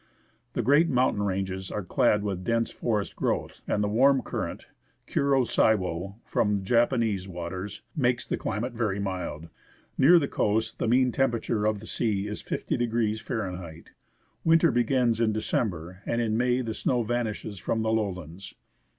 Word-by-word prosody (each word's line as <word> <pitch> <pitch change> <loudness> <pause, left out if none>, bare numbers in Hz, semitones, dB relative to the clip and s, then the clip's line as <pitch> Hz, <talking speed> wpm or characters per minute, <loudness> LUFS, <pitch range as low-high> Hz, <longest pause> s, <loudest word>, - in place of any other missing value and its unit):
The 120 - -1
great 145 +8 +4
mountain 125 -6 +2
ranges 95 -1 -2
are 105 - -3
clad 105 +3 +2
with 95 -3 -3
dense 115 +2 0
forest 105 -4 -2
growth, - - -2
and 105 - +1
the - - +1
warm 130 +5 +4
current, - - -4 0.4
Kuro 140 -2 +2
Siwo, 95 -5 +1
from 105 -2 0
Japanese 115 -3 +1
waters, 90 +2 -6
makes 125 -5 +1
the - - 0
climate 115 +4 -3
very 110 -4 -1
mild. 90 -5 -4 0.5
Near 165 +7 +8
the 145 -4 +2
coast 110 0 0
the - - 0
mean 125 +2 +4
temperature 115 -4 0
of 110 -2 -1
the - - -10
sea 105 -3 -1
is 105 0 -5
50° 115 -2 -1 0.6
F. - - -21 0.5
Winter 165 0 +5
begins 120 -1 +2
in 110 -2 +2
December, 95 -4 -2
and 115 - 0
in 110 -2 0
May 125 +2 +2
the 115 -3 -3
snow 120 +2 0
vanishes 110 -3 -3
from 110 +4 -1
the 110 - +1
lowlands. 95 -5 -3
110 Hz, 155 wpm, -27 LUFS, 100-120 Hz, 0.6 s, Near